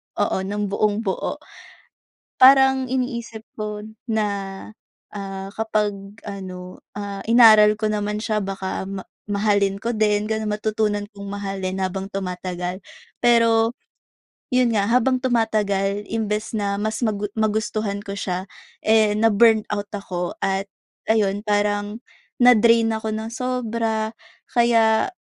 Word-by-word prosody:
oo, - - 0
ng 205 +1 -2
buong-buo. 205 -1 -1 1.0
Parang 265 0 +6
iniisip 235 -4 -3
ko 210 -1 -4 0.3
na, 215 -1 +1 0.9
ah, 195 -1 -5
kapag 215 -2 0 0.3
ano, 185 -2 -8 0.2
ah, 200 -1 -5
inaral 215 -2 +7
ko 215 - 0
naman 210 0 -2
siya 215 -1 -1
baka 195 -1 -4
ma 190 0 -7 0.2
mahalin 200 -1 +1
ko 235 +3 -2
din 210 -1 +1
ganoon, 220 -1 -1
matutunan 210 -1 -1
kong 200 0 -8
mahalin 195 -2 -4
habang 190 +1 -3
tumatagal. 180 -1 -4 0.4
Pero, 230 -1 +4 0.8
iyon 250 -2 +3
nga, 200 -1 +2
habang 255 +1 +3
tumatagal 210 -5 0
imbes 215 -1 -2
na 205 -2 -1
mas 215 +1 -2
magu 210 -3 -1
magustuhan 215 -1 -1
ko 200 - -7
siya 185 -2 -3 0.4
eh, 215 -1 +4
na-burn 220 0 +4
out 205 -1 -2
ako 180 -3 -4
at, 195 0 0 0.4
ayon 205 -3 +2
parang, 205 +2 0 0.4
na-drain 230 -1 +5
ako 220 0 -3
ng 220 +1 -4
sobra. 230 -3 -2 0.4
Kaya, 230 - +3
210 Hz, 120 wpm, -22 LUFS, 200-225 Hz, 1.0 s, inaral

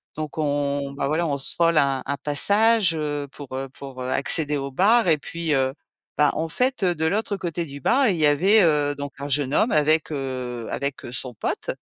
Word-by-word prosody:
Donc, 155 0 -6
on, 145 -2 -1
bah, 140 0 -2
voilà, 160 +4 0
on 140 -2 -1
se 135 - +2
vole 165 -1 +3
un 135 -2 +1
un 140 - -2
passage, 200 - +3
heu, 145 -2 -3
pour, 145 - -10
heu, 135 0 -4
pour 135 -1 -10
accéder 145 +3 +1
au 140 0 -4
bar 210 - +3
et 160 -2 +4
puis, 165 +1 -3
heu, 130 0 +1 0.5
bah, 150 -1 +5
en 160 - -2
fait, 250 - -1
heu, 180 -2 +3
de 160 0 -2
l'autre 200 +2 -1
côté 170 -2 -3
du 140 -1 -10
bar, 265 - +3
il 180 - 0
y 155 - +2
avait, 190 +9 +4
heu, 150 -3 +2
donc 145 -1 -6
un 140 - -5
jeune 140 0 0
homme 230 - +2
avec, 155 +1 +2
heu, 130 -4 -4
avec, 140 -1 -4
heu, 120 - -8
son 125 0 -4
pote - - -3
145 Hz, 220 wpm, -23 LUFS, 140-170 Hz, 0.5 s, bah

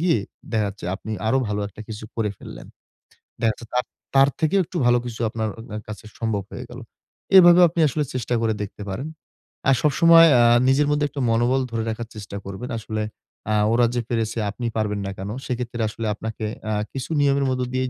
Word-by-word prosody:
গিয়ে 170 -9 +3 0.3
দেখা 110 -2 +2
যাচ্ছে 100 -3 -9
আপনি 110 +2 -7
আরো 130 +4 +3
ভালো 105 0 -1
একটা 105 - -14
কিছু 110 0 -7
করে 110 -3 0
ফেললেন। - - -10 0.8
দেখাচ্ছে 115 0 0
তার 125 - +1 0.3
তার 135 +1 +6
থেকেও 165 +5 +2
একটু 175 - -6
ভালো 120 0 +5
কিছু 115 -1 -6
আপনার 110 -1 -2
অ - - -7
অ্যা 105 - -4
কাছে 105 +1 -8
সম্ভব 110 -4 -1
হয়ে - - -7
গেল। - - -9 0.6
এভাবে 175 -1 +8
আপনি 170 +1 -4
আসলে 150 +2 -1
চেষ্টা 125 -1 -1
করে 110 -1 +1
দেখতে 105 0 -7
পারেন। 120 +10 -4 0.6
আর 135 - +6
সবসময় 165 +3 +7
আ - - +6 0.3
নিজের 145 +2 +3
মধ্যে 145 0 +2
একটু 145 - -7
মনোবল 120 +4 +2
ধরে 115 -1 -1
রাখার 115 +1 -4
চেষ্টা 100 -1 -7
করবেন। 100 +6 -6
আসলে 110 0 -4 0.5
আ - - +2 0.2
ওরা 120 0 +4
যে 120 - +1
পেরেছে 115 -1 -1
আপনি 120 +4 -6
পারবেন 105 -2 -1
না 100 - -3
কেন? 95 +2 -5 0.2
সেক্ষেত্রে 120 -2 -3
আসলে 110 +1 -6
আপনাকে 110 0 -5 0.3
আ - - +1 0.2
কিছু 135 +2 -5
নিয়মের 140 -1 +2
মধ্যে 130 -1 -1
দিয়েই 130 0 0
115 Hz, 200 wpm, -23 LUFS, 110-135 Hz, 0.8 s, এভাবে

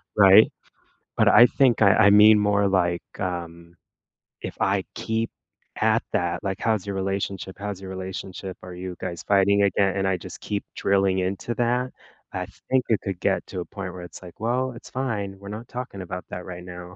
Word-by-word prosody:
right? - - +7 0.7
But - - +4
I 120 - +8
think 130 -4 +2
I 100 0 +6
I - - +8
mean 105 +1 +7
more 100 -1 +2
like, 90 -2 +1 0.2
um, 85 -2 -5 0.7
if - - -6
I 95 -1 +1
keep 115 0 -2 0.5
at 110 +1 +3
that, 85 -3 -1
like, 95 0 -3
"How's 110 -3 0
your 100 - -3
relationship? 95 0 -3
How's 100 -2 -5
your 95 - -7
relationship? 95 0 -6
Are 90 -1 -9
you 90 0 -6
guys 90 -3 -5
fighting 100 0 +4
again?" 100 0 +2
And 95 0 +1
I 95 - +1
just 90 - -10
keep 100 -1 -3
drilling 95 -1 +2
into 95 +5 -2
that, 125 +2 0 0.4
I - - -3 0.3
think 130 -1 +3
it 110 - +3
could 95 -3 -4
get - - +1
to 90 - -5
a - - -4
point 95 -2 -7
where 90 - -8
it's 85 0 -11
like, 90 -2 -12
"Well, 125 +4 -1
it's 115 - -12
fine, 105 -7 -3
we're 100 0 -11
not 110 +3 -7
talking 125 -6 -6
about 90 0 -6
that 90 - -6
right 90 -1 -8
now," 90 0 -9
95 Hz, 195 wpm, -24 LUFS, 90-105 Hz, 0.7 s, I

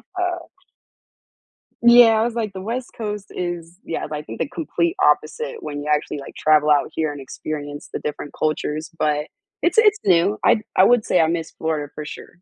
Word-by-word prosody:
Uh 355 -1 -2 1.4
Yeah, 235 -2 +8
I - - +3
was 235 0 -2
like 215 -4 -2
the 190 - -6
West 240 +5 -4
Coast 210 -2 -5
is, 175 0 -5
yeah, 165 - -4
I 150 0 -3
think - - -9
the - - 0
complete 335 +3 -1
opposite 475 0 +1
when 145 0 -5
you 150 - -5
actually 150 0 0
like 140 - -10
travel 150 -1 +3
out 145 -1 +3
here 155 -2 -1
and 145 - -8
experience 145 +2 -6
the - - -4
different 145 -1 -5
cultures, 155 +2 -2
but 150 0 +1 0.4
it's - - +1
it's 425 -1 +6
new. 170 - +3
I'd 215 - +4
I 185 - +6
would 240 +1 +4
say 180 - +3
I 160 - +3
miss 165 -1 -2
Florida 155 -3 -3
for 150 - -6
sure. 175 +3 -10
170 Hz, 195 wpm, -21 LUFS, 150-230 Hz, 1.4 s, Yeah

